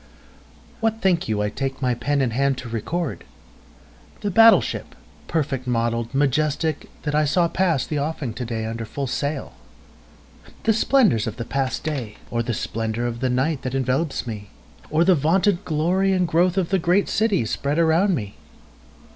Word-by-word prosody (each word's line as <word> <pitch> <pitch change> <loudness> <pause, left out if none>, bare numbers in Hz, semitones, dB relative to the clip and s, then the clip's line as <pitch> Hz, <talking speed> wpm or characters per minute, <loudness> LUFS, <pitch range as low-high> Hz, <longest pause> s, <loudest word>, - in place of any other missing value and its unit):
WHAT 225 0 0
think 185 -5 +1
you 105 -1 0
I 105 - -1
take 135 +2 -3
my 125 -2 +1
pen 145 +4 0
in 125 - 0
hand 135 +2 +1
to 125 - -7
record? 140 +10 -3 1.0
The 205 -2 -1
battle 225 +4 +8
ship, - - -5 0.3
perfect 135 -5 -2
model'd, 115 0 -1
majestic, 150 +2 0
that 150 - -2
I 150 +1 +3
saw 170 +4 +2
pass 165 -6 +1
the 150 - -2
offing 145 -5 -3
to 110 - -5
day 115 -2 -3
under 115 +1 -4
full 135 +5 -4
sail? 140 +4 -3 1.1
The 225 - +3
splendors 215 - +3
of 110 +1 -5
the 115 - -4
past 135 +1 -2
day? 130 -9 -4
Or 115 - 0
the 120 -1 -2
splendor 110 +2 -2
of 120 -1 -3
the 130 +1 0
night 135 +3 0
that 130 0 -3
envelopes 135 +4 0
me? 105 -4 -6 0.4
Or 155 +2 +3
the 185 +2 +5
vaunted 180 +5 +2
glory 180 +5 +1
and 180 -2 +1
growth 175 +3 +2
of 185 -3 +1
the 195 - +2
great 180 +4 +2
city 205 - +1
spread 140 +6 -2
around 170 +4 +3
me? 105 -7 -6
145 Hz, 175 wpm, -23 LUFS, 120-170 Hz, 1.1 s, battle